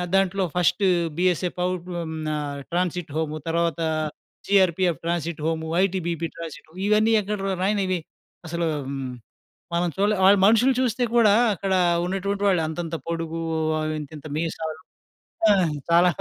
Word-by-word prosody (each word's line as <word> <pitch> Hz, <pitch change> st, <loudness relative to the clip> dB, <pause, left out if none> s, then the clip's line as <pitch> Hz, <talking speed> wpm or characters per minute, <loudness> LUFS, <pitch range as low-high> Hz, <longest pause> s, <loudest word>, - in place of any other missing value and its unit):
దాంట్లో 195 Hz, 0 st, +2 dB
first 180 Hz, +3 st, +2 dB, 0.3 s
BSA 180 Hz, 0 st, +2 dB
పౌ 180 Hz, -, +2 dB
ఆహ్, 175 Hz, -, -18 dB, 0.2 s
హ్మ్, 160 Hz, 0 st, -5 dB
న 155 Hz, -, 0 dB, 0.4 s
ట్రాన్సిట్ 180 Hz, -2 st, -1 dB
హోము 155 Hz, -1 st, -1 dB
తర్వాత 170 Hz, 0 st, 0 dB, 0.7 s
జీఆర్‌పిఎఫ్ 185 Hz, -3 st, +3 dB
ట్రాన్సిట్ 170 Hz, -2 st, -2 dB
హోమ్, 160 Hz, 0 st, -1 dB, 0.2 s
ఐటీబీపీ 170 Hz, -3 st, -1 dB
ట్రాన్సిట్ 160 Hz, -2 st, -9 dB, 0.2 s
ఇవన్నీ 215 Hz, +1 st, +4 dB
ఎక్కడ 210 Hz, +1 st, -3 dB, 0.2 s
రానివి. 190 Hz, -3 st, +1 dB, 0.5 s
అసలు 170 Hz, +1 st, -2 dB
ఆహ్, 140 Hz, -, -5 dB
హ్మ్, 135 Hz, -2 st, -4 dB, 0.6 s
మనం 175 Hz, 0 st, +1 dB
చూడలే. 205 Hz, +2 st, +2 dB
వాళ్ళు 200 Hz, +1 st, +7 dB
మనుషులు 230 Hz, +5 st, +5 dB
చూస్తే 250 Hz, 0 st, 0 dB
కూడా 215 Hz, -4 st, +6 dB, 0.2 s
అక్కడ 190 Hz, +1 st, -2 dB, 0.3 s
ఉన్నటువంటి 195 Hz, +2 st, -2 dB
వాళ్ళు 185 Hz, -4 st, +3 dB
అంతంత 165 Hz, 0 st, -4 dB
పొడుగు 165 Hz, 0 st, -3 dB, 0.6 s
ఇంతింత 150 Hz, +1 st, -9 dB
మీసాలు 160 Hz, -1 st, -3 dB, 0.7 s
ఆ! -, -, +7 dB, 0.4 s
చాలా 170 Hz, +2 st, +6 dB
175 Hz, 135 wpm, -24 LUFS, 165-195 Hz, 0.7 s, వాళ్ళు